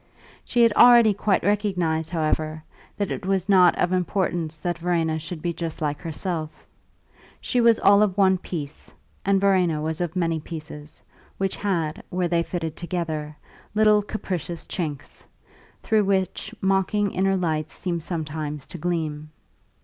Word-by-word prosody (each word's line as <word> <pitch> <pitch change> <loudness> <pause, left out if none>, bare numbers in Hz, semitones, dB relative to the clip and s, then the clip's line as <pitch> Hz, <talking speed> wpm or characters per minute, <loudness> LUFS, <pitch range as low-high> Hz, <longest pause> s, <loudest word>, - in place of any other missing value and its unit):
She 240 - +2
had 230 -2 +5
already 235 -2 +7
quite 205 0 +1
recognised, 180 -6 0
however, 155 -1 -1 0.3
that 200 -2 -2
it - - -4
was 190 -1 0
not 185 -3 +5
of 180 +1 +1
importance 175 -3 -1
that 175 +1 -3
Verena 165 -2 0
should 155 0 -7
be 170 -1 -1
just 165 -1 -5
like 150 -1 -2
herself; 160 -1 -4 0.7
she 245 - 0
was 230 -1 +5
all 200 +1 +6
of 205 -2 +1
one 190 -2 +4
piece, 155 -5 -7 0.3
and 195 0 +3
Verena 185 -5 +2
was 160 +2 -2
of 175 0 -3
many 165 -3 0
pieces, 155 -1 -9 0.3
which 195 -1 -1
had, 170 -7 -2
where 180 0 0
they 170 -1 +1
fitted 165 -2 -4
together, 160 -4 -4 0.4
little 210 -1 +5
capricious 180 -5 -5
chinks, 150 -6 -5 0.6
through 215 -2 +2
which 190 +1 -1
mocking 195 +1 +1
inner 195 +1 +1
lights 160 -4 -1
seemed 170 -2 -3
sometimes 155 -3 -4
to 175 - -9
gleam. 155 -3 -2
175 Hz, 150 wpm, -24 LUFS, 160-195 Hz, 0.7 s, already